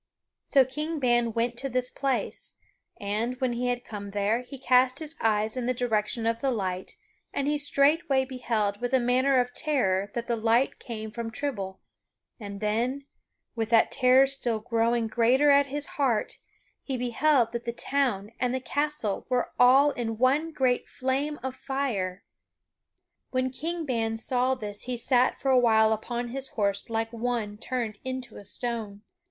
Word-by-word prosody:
So 270 -2 +5
King 300 +5 -4
Ban 240 -4 +2
went 235 +1 -1
to 275 - -3
this 250 0 +1
place, 275 -2 -2 0.4
and, 215 +5 -2
when 255 -2 0
he 245 +1 -1
had 245 0 -2
come 205 -2 -7
there, 205 +3 0
he 260 +2 -10
cast 255 0 +3
his 315 0 -2
eyes 215 0 +2
in 250 -2 -2
the 255 - +1
direction 225 -1 -1
of 230 0 +1
the 275 - +1
light 190 -6 -3 0.4
and 280 - -2
he 295 - +2
straightway 280 -1 +2
beheld 230 -5 -2
with 245 +2 +1
a - - +4
manner 255 +2 +3
of 245 0 -1
terror 200 -12 0
that 235 -1 -2
the 235 - 0
light 230 +3 +2
came 220 -3 -6
from 235 0 -4
Trible; 220 -7 -4 0.6
and 200 -2 -7
then, 240 +6 -1 0.5
with 225 -2 -2
that 230 -1 +4
terror 260 0 +5
still 265 -4 -1
growing 230 +1 +1
greater 245 +6 +3
at 280 0 +5
his 290 +1 -3
heart, 260 -9 -1 0.4
he 265 -2 -3
beheld 250 0 +2
that 235 0 -5
the 235 - -1
town 235 -5 -1
and 250 +1 0
the - - -1
castle 290 -6 -2
were 250 -1 0
all 270 +4 +6
in 225 -4 -3
one 275 +7 +2
great 260 -5 +1
flame 275 +3 -2
of 260 -1 -3
fire. 240 -10 -3 1.1
When 255 0 0
King 330 +5 -4
Ban 225 -4 -1
saw 255 +2 +1
this 205 -4 -5
he 250 -1 -3
sat 250 +1 +2
for 270 - +1
a 255 - +6
while 220 -2 +4
upon 240 +2 -4
his 270 +2 -5
horse 200 -2 -2
like 225 0 -2
one 230 -3 -2
turned 235 -4 -3
into 255 -2 -5
a - - -10
stone. 215 -1 -4
245 Hz, 170 wpm, -27 LUFS, 225-265 Hz, 1.1 s, all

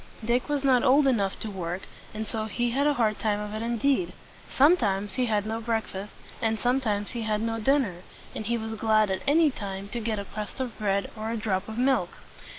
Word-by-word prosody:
Dick 245 +5 +1
was 290 -1 0
not 260 -3 +4
old 280 +3 +5
enough 205 -8 +1
to 220 - -4
work, 180 -1 -4 0.3
and 215 +1 -4
so 220 0 -3
he 240 +2 -1
had 280 +4 +2
a 295 - +3
hard 220 -4 +1
time 210 -2 +1
of 210 0 -5
it 215 - -3
indeed. 260 +8 +1 0.4
Sometimes 210 - +3
he 250 +3 0
had 210 -2 +1
no 225 +1 -3
break 225 -1 0
fast, 195 +2 -8 0.3
and 225 -1 +1
sometimes 235 -5 0
he 235 - -4
had 215 -1 0
no 225 +1 -1
dinner; 255 -6 +2 0.4
and 215 - -5
he 235 +1 +1
was 220 0 -4
glad 215 -2 +2
at 190 - -1
any 305 +1 +5
time 195 -4 -6
to 240 - -3
get 220 -1 -2
a 200 - -4
crust 210 +5 -7
of 255 -3 -3
bread 200 -1 0
or 220 0 -4
a 230 - -1
drop 205 -2 -1
of 220 - -6
milk. 250 -8 +2
220 Hz, 225 wpm, -27 LUFS, 210-245 Hz, 0.4 s, old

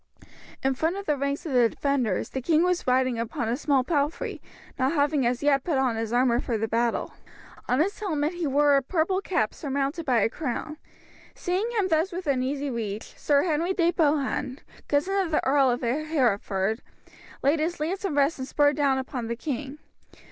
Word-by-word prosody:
In 270 0 +2
front 320 +7 -1
of 400 - -6
the 300 - +1
ranks 280 +2 -2
of 315 - -4
the 240 -2 +5
defenders 255 -9 -1
the 265 - -4
king 320 +5 +3
was 360 -4 0
riding 255 -2 +2
upon 230 0 -3
a 230 - 0
small 275 -1 +1
palfrey, 295 +2 -1 0.4
not 260 +4 +2
having 285 -4 +2
as 245 +3 -1
yet 280 -2 +3
put 320 -6 0
on 260 -3 +1
his 225 0 -3
armour 245 0 +3
for 235 -3 -2
the 225 +1 -1
battle. 230 +1 0 0.6
On 250 +2 +2
his 380 +6 0
helmet 320 -6 -1
he 345 -3 -2
wore 285 +1 +4
a 275 - +4
purple 350 +6 0
cap 345 - 0
surmounted 280 +3 -2
by 250 -7 +2
a - - +4
crown. 300 +4 -4 0.6
Seeing 375 +5 -1
him 400 -3 +2
thus 325 +4 +2
within 300 -8 -1
easy 275 +2 -2
reach, 220 -3 -5
Sir 285 -1 +2
Henry 340 +2 0
de 340 -1 +3
Bohun, 290 -5 0 0.3
cousin 295 +7 +1
of 350 - -4
the 310 - 0
Earl 270 0 +4
of 245 0 -1
Hereford, 235 -7 0 0.6
laid 290 +4 +3
his 330 +2 -1
lance 350 +6 -2
in 380 -7 -1
rest 285 +1 +2
and 260 - -4
spurred 290 0 +3
down 280 -2 +2
upon 260 -3 -4
the 235 - -2
king. 275 +2 -5
280 Hz, 195 wpm, -26 LUFS, 250-315 Hz, 0.6 s, the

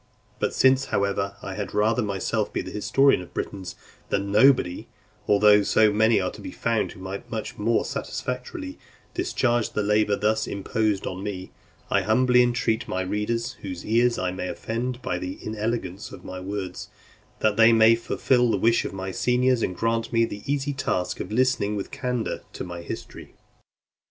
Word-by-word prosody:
But - - -1
since, 130 +1 +4
however, 100 -2 -1
I 95 - -5
had 100 +1 -5
rather 110 +4 +2
myself 100 -3 -1
be - - -2
the - - -8
historian 135 +2 +3
of 90 - -9
the - - -26
Britons 95 -2 -5 0.3
than 100 0 -1
nobody, 105 -5 +4 0.4
although 105 0 +6
so 105 +1 +3
many 110 +2 +4
are - - -1
to - - -11
be - - -6
found - - -1
who - - -14
might 95 +1 -7
much 110 -2 -5
more 115 +2 +1
satisfactorily 130 - -5 0.3
discharge 125 - 0
the 105 - 0
labour 105 0 +2
thus 110 +2 0
imposed 100 0 -1
on 95 +1 -4
me; 95 -2 -5 0.4
I - - +3
humbly 125 +3 +4
entreat 120 -2 +1
my 95 - -2
readers, 115 +5 -2
whose 90 -3 -6
ears 120 +2 +3
I 90 -1 -1
may 90 0 -4
offend 120 +5 -4
by 90 - -2
the 90 +1 -5
inelegance 110 -3 -4
of - - -11
my 95 - -6
words, 95 -1 -5 0.5
that 110 -1 +3
they 115 +1 +7
will 115 0 +6
fulfil 120 +1 +1
the 105 - +2
wish 115 +4 +3
of - - -4
my 95 0 -4
seniors, 125 +3 +2
and 90 - -1
grant 115 0 0
me 115 -1 +3
the 105 -2 -7
easy 145 0 -1
task 90 -8 -2
of 90 - -5
listening 120 -3 +1
with 100 - -5
candour 125 -2 -2
to - - -5
my 85 -1 -7
history. 85 - -8
110 Hz, 180 wpm, -25 LUFS, 100-120 Hz, 0.5 s, they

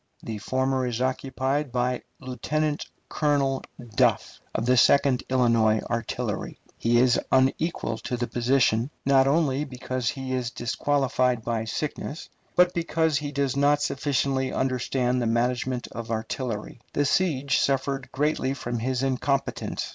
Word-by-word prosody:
The 110 -2 -5
former 130 +2 0
is 120 -1 -2
occupied 130 +2 -1
by 125 0 0 0.2
Lieutenant 145 +4 -2 0.2
Colonel 140 -3 +1 0.3
Duff, 115 -6 +2 0.2
of 110 - 0
the 125 +1 +4
Second 135 +1 +4
Illinois 115 -4 +3
Artillery. 115 -2 -3 0.2
He 120 +1 +3
is 125 0 +4
unequal 130 -2 +1
to 125 - -3
the 120 - -1
position, 120 -1 +2 0.2
not 135 -1 +5
only 145 -1 +2
because 130 -3 -3
he 130 -1 -4
is 125 -2 -1
disqualified 125 -1 0
by 115 -1 -1
sickness, 150 +5 -4 0.3
but 180 0 +5
because 165 -2 +1
he 145 -1 -4
does 140 -2 0
not 145 +1 +3
sufficiently 135 -1 0
understand 125 -1 0
the 120 - 0
management 120 +2 0
of 115 0 -7
artillery. 115 0 -4
The 145 - +1
siege 140 -5 +2
suffered 135 -1 0
greatly 140 -2 0
from 120 -3 -3
his 130 +2 -1
incompetence. 135 +1 -1
130 Hz, 135 wpm, -26 LUFS, 120-140 Hz, 0.3 s, not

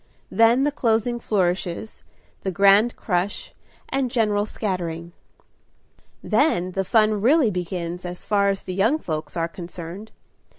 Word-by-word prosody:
Then 230 +3 +4
the 295 - +2
closing 240 -2 0
flourishes, 185 -1 -2 0.4
the 195 - -2
grand 200 +5 +4
crush, 185 0 -2 0.4
and 270 -2 0
general 210 -3 +1
scattering. 170 -6 -4 1.1
Then 185 - +1
the 195 +1 -1
fun 215 +1 +2
really 260 0 +4
begins, 175 -1 -4
as 180 0 -7
far 200 -1 +2
as 195 -1 -2
the 185 - -5
young 220 +11 +2
folks 155 - -5
are 165 0 0
concerned. 175 +4 -8
200 Hz, 130 wpm, -23 LUFS, 180-225 Hz, 1.1 s, Then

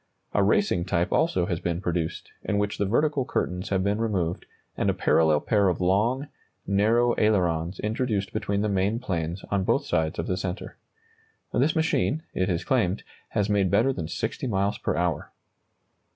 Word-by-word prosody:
A 100 - +3
racing 100 - +2
type 85 -3 0
also 95 - +2
has 85 -2 -2
been 85 -1 -2
produced, 85 -3 -3
in 105 - -1
which 105 0 -1
the 100 - +1
vertical 145 +5 +2
curtains 90 -4 -2
have 95 -2 +1
been 100 +2 0
removed 95 -7 -1 0.3
and - - 0
a - - +1
parallel 80 -2 +3
pair 100 -3 +2
of 90 - -1
long, 110 +10 +1 0.4
narrow 115 +5 +3
ailerons 90 -5 +1
introduced 105 -2 -1
between 100 0 -1
the 105 - +1
main 100 +2 +1
planes 90 -6 -3
on 100 -2 +1
both - - +1
sides 80 -2 0
of 80 - -2
the 90 - -1
centre. 95 +1 -5 0.8
This 145 +6 +2
machine, 160 - +1
it 95 +1 0
is 85 -2 -1
claimed, 110 -7 +1 0.3
has 100 -1 +2
made 100 -3 +2
better 115 +8 +3
than 85 -9 -4
60 105 - -3
miles 100 -1 0
per - - -1
hour. 85 -1 -1
100 Hz, 175 wpm, -26 LUFS, 90-110 Hz, 0.8 s, A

